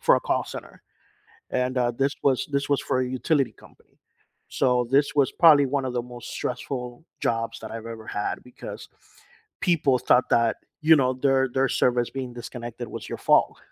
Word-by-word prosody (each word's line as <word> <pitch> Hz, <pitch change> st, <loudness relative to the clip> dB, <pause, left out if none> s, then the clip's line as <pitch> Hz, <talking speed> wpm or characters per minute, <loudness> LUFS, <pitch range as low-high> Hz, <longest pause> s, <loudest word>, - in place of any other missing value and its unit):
for -, -, +5 dB
a -, -, -1 dB
call -, -, 0 dB
center, -, -, -10 dB, 0.7 s
and, 130 Hz, 0 st, 0 dB
uh, 120 Hz, -1 st, +2 dB
this 135 Hz, +4 st, 0 dB
was 135 Hz, -3 st, +2 dB
this 140 Hz, 0 st, 0 dB
was 140 Hz, -1 st, +2 dB
for 130 Hz, -, 0 dB
a 130 Hz, -, 0 dB
utility 135 Hz, +1 st, 0 dB
company, -, -, -21 dB, 0.5 s
so 125 Hz, -2 st, +1 dB
this 140 Hz, +2 st, +3 dB
was 140 Hz, -2 st, +2 dB
probably 155 Hz, -4 st, +6 dB
one 135 Hz, 0 st, -1 dB
of 125 Hz, -, -4 dB
the 120 Hz, -, 0 dB
most 120 Hz, 0 st, -10 dB
stressful 125 Hz, +1 st, -5 dB, 0.2 s
jobs 115 Hz, 0 st, -1 dB
that 110 Hz, -, -8 dB
I've 115 Hz, 0 st, -7 dB
ever 115 Hz, -1 st, -8 dB
had 105 Hz, -, -3 dB
because 125 Hz, -, -9 dB, 0.7 s
people 150 Hz, -7 st, +2 dB
thought 125 Hz, +1 st, +3 dB
that, 115 Hz, -1 st, +3 dB, 0.3 s
you 160 Hz, +1 st, +7 dB
know, 130 Hz, -2 st, +2 dB
their 135 Hz, 0 st, +2 dB
their 135 Hz, 0 st, +2 dB
service 120 Hz, -1 st, +1 dB
being 130 Hz, -2 st, -6 dB
disconnected 120 Hz, -1 st, -7 dB
was -, -, -7 dB
your -, -, -5 dB
fault. -, -, +3 dB
130 Hz, 185 wpm, -25 LUFS, 120-135 Hz, 0.7 s, you